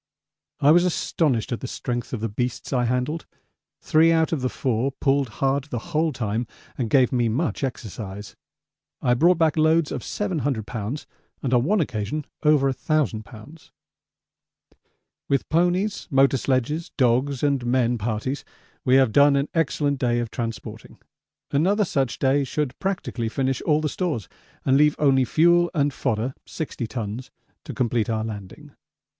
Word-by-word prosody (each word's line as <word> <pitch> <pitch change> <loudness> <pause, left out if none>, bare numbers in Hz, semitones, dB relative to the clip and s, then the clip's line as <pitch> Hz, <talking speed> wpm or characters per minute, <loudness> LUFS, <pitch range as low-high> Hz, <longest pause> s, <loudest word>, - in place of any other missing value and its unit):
I 145 - +6
was 175 +2 +6
astonished 155 -9 0
at 120 - -2
the 130 - -5
strength 120 -1 -4
of 120 - -4
the 115 - 0
beasts 120 +6 -3
I 125 -2 +2
handled; 125 +7 -1 0.5
three 160 +1 +4
out 160 -1 +2
of 160 -5 -1
the 130 - 0
four 130 +1 -1
pulled 135 -1 +1
hard 135 +6 0
the 145 +5 -7
whole 160 +1 +2
time 115 -2 -2 0.3
and 120 -4 -2
gave 130 +1 +4
me 120 -2 +1
much 140 +6 -1
exercise. 105 -5 -6 0.7
I 125 - +3
brought 170 +8 +4
back 160 -2 +2
loads 155 0 +3
of - - -4
700 145 - -2
lbs. 115 +5 -5 0.4
and 130 -2 -1
on 120 -1 +4
one 205 +9 +2
occasion 125 - -2 0.2
over 150 -3 +4
1000 135 -5 -1
lbs. 115 +10 -14 1.6
With 140 -1 +1
ponies, 180 +5 +1
motor 135 -2 +4
sledges, 135 +6 -1
dogs, 130 +2 +2
and 140 -3 +1
men 120 -1 +1
parties 120 +6 -2 0.4
we 130 0 +4
have 135 -4 +5
done 140 +4 +5
an 140 +1 0
excellent 145 -3 0
day 120 -1 +1
of 120 -2 -2
transporting 115 -4 -6 0.5
another 195 +9 +2
such 135 -7 -1
day 140 +1 +2
should 135 0 -2
practically 185 - -2
finish 135 +2 -1
all 155 -1 +3
the 155 - 0
stores 150 - -2 0.4
and 135 0 +4
leave 150 0 +4
only 135 -3 +3
fuel 175 +4 +4
and 145 -2 +1
fodder 125 0 -1
(60 135 -6 -4
tons) 115 +1 -5 0.4
to - - -6
complete 120 -3 0
our 110 -1 0
landing. 105 -4 -8
135 Hz, 160 wpm, -24 LUFS, 120-150 Hz, 1.6 s, I